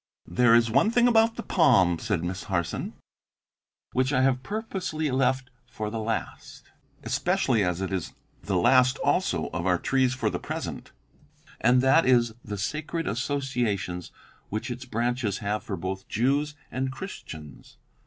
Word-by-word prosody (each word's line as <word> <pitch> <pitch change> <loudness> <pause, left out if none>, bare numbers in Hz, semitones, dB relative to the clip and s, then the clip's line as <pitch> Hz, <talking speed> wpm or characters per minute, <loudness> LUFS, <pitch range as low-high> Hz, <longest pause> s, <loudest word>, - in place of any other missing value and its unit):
"There 120 -2 +4
is 115 -1 +3
one 210 - +4
thing 240 +1 +4
about 225 -1 +4
the 235 - -5
palm," 95 - +4
said 90 -4 -1
Miss 90 +1 -4
Harson, 85 -3 -2 1.0
"which 130 +2 +1
I 130 -2 +3
have 130 -1 +2
purposely 185 - -3
left 130 0 +1 0.2
for 105 -1 -5
the 115 - -3
last 110 0 -5 0.3
especially 110 -3 +1
as 90 0 -1
it 95 0 -3
is 95 -3 -3 0.3
the 100 - -2
last 125 +7 +4
also - - +1
of 85 +2 -3
our 90 -1 +3
trees 130 +4 +1
for 130 - -1
the - - -3
present - - -6 0.7
and 125 +2 +4
that 135 +3 +5
is 120 -3 +4
the 105 -1 -5
sacred 155 - -3
associations 115 - -2 0.4
which 110 +4 -3
its 125 +2 -6
branches 120 -3 -1
have 105 +1 -2
for 95 - -4
both 95 +1 -5
Jews 140 +6 +1 0.2
and 130 +1 -2
Christians. 80 - -9
125 Hz, 155 wpm, -26 LUFS, 100-135 Hz, 1.0 s, that